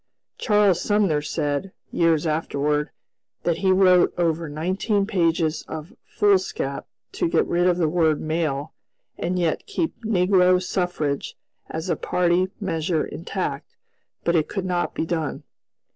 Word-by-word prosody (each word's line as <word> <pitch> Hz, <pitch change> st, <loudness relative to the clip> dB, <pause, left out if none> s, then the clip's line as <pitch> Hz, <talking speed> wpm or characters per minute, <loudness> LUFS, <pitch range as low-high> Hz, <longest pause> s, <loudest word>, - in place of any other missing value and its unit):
Charles 205 Hz, -5 st, +3 dB
Sumner 200 Hz, -8 st, +2 dB
said, 145 Hz, +4 st, -2 dB, 0.2 s
years 165 Hz, -2 st, +2 dB
afterward, 150 Hz, -1 st, 0 dB, 0.5 s
that 170 Hz, 0 st, 0 dB
he 190 Hz, -1 st, +3 dB
wrote 185 Hz, -1 st, +5 dB
over 165 Hz, -2 st, 0 dB
nineteen 190 Hz, +7 st, 0 dB
pages 165 Hz, -5 st, +1 dB
of 155 Hz, +2 st, -7 dB
foolscap 190 Hz, -9 st, 0 dB, 0.2 s
to -, -, -1 dB
get -, -, +2 dB
rid 175 Hz, +1 st, +1 dB
of 180 Hz, -1 st, +3 dB
the 170 Hz, -3 st, +2 dB
word 160 Hz, -1 st, +2 dB
"male" 155 Hz, -2 st, -2 dB, 0.5 s
and 180 Hz, +2 st, -1 dB
yet 170 Hz, -3 st, -1 dB
keep 345 Hz, -6 st, -2 dB
"negro 185 Hz, -3 st, +4 dB
suffrage" 180 Hz, -6 st, -2 dB, 0.3 s
as 160 Hz, +3 st, -4 dB
a -, -, +1 dB
party 180 Hz, +1 st, +1 dB
measure 165 Hz, -4 st, -1 dB
intact; 170 Hz, -, -5 dB, 0.5 s
but 170 Hz, -, +1 dB
it 155 Hz, -2 st, +2 dB
could 195 Hz, -2 st, -3 dB
not 180 Hz, -1 st, -1 dB
be -, -, -1 dB
done. 160 Hz, -2 st, -3 dB
175 Hz, 135 wpm, -23 LUFS, 155-185 Hz, 0.5 s, wrote